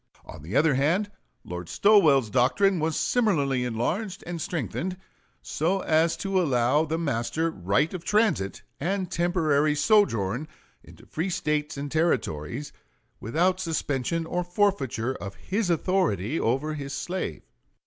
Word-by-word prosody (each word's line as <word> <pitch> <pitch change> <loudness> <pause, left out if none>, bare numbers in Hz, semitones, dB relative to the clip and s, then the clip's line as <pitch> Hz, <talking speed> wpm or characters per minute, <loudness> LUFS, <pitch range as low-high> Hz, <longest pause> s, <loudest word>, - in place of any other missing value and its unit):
On 80 - -10
the 85 - -6
other 150 +1 +4
hand, 170 +10 +1 0.3
Lord 90 -1 -6
Stowell's 150 - +4
doctrine 180 - +3
was 160 0 0
similarly 155 - +1
enlarged 155 - -2
and 175 -2 -5
strengthened 180 +2 -3 0.5
so 180 +5 0
as 160 0 +2
to 195 -1 0
allow 135 0 +2
the 160 +1 -2
master 145 +1 -1
right 125 - 0
of 180 -2 -5
transit 185 - +1 0.2
and 185 +3 -2
temporary 155 -4 +2
sojourn 145 - +2 0.4
in - - -15
free 165 +5 -2
States 150 -4 -1
and 140 0 -5
Territories 135 - -1 0.5
without 180 - +1
suspension 165 -2 -1
or 175 +2 -2
forfeiture 175 - 0
of 100 -5 -8
his 200 0 -2
authority 165 - 0
over 135 +7 0
his 140 -2 -5
slave. 180 +6 -4
155 Hz, 130 wpm, -26 LUFS, 130-180 Hz, 0.5 s, other